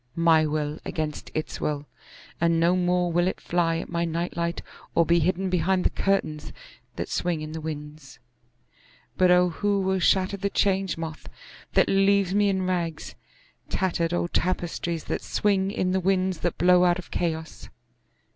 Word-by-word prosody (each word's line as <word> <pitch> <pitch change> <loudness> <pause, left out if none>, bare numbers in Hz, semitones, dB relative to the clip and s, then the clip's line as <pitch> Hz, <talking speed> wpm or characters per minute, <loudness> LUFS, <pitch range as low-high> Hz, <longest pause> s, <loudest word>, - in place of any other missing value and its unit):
My 165 -2 +4
will 150 0 -2
against 155 -3 -4
its 155 - -4
will, 145 -1 -2 0.5
and 170 0 +2
no 170 +2 +3
more 180 -1 +1
will 175 +2 +2
it - - -2
fly 165 -1 0
at - - -5
my 170 0 -1
night 170 +1 -2
light 170 0 -2 0.3
or 170 - +4
be 170 +2 +3
hidden 185 +3 0
behind 185 +1 +1
the - - +3
curtains 175 -6 -1 0.4
that - - -4
swing 175 -3 -1
in 155 0 -6
the 160 0 -6
winds.(But 150 +1 -6
O 180 0 +5
who 200 +4 0
will 190 0 0
shatter 190 +2 +2
the 200 +1 -1
Change 195 -2 +1
Moth 160 -1 -7 0.4
that - - +4
leaves 195 -1 +3
me 205 0 +3
in 190 -1 0
rags—tattered 170 0 -3
old 175 0 -1
tapestries 170 -2 -1
that - - -3
swing 195 -2 +1
in 185 -2 -1
the 190 - +1
winds 185 -1 0
that 175 0 -2
blow 180 +1 +5
out 175 0 +3
of 185 - -10
Chaos!) 160 -2 -3
175 Hz, 165 wpm, -25 LUFS, 160-185 Hz, 0.5 s, O